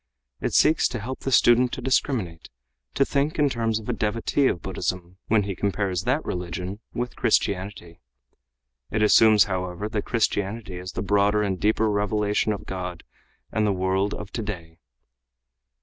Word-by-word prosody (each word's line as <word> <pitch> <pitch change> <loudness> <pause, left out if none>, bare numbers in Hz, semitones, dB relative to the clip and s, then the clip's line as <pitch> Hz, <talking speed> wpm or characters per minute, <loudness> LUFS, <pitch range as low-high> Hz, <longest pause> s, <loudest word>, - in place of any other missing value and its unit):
It - - -2
seeks 155 - +4
to 120 - -5
help 130 +5 -5
the 135 - -3
student 120 0 +5
to - - -3
discriminate, 110 - -1 0.5
to 135 - +3
think 140 +3 0
in 145 -2 +3
terms 115 -2 0
of 110 - -8
a - - 0
devotee 115 +6 +1
of 85 - -2
Buddhism 90 0 -4
when 110 -2 +3
he 100 -1 -4
compares 95 -2 -1
that - - 0
religion 90 +3 -4
with 120 +1 -4
Christianity. 95 -3 -1 0.9
It 110 0 0
assumes, 105 -1 +6
however, 95 +1 -3
that 105 -1 -3
Christianity 105 -3 -1
is 90 0 -7
the - - -3
broader 105 +1 +2
and 95 -3 -2
deeper 110 +1 +2
revelation 105 0 +1
of 105 0 -5
God 90 -2 -5 0.5
and 110 -1 +1
the - - +2
world 95 +1 0
of 100 -2 -8
today. 90 -7 -6
105 Hz, 160 wpm, -24 LUFS, 95-110 Hz, 0.9 s, assumes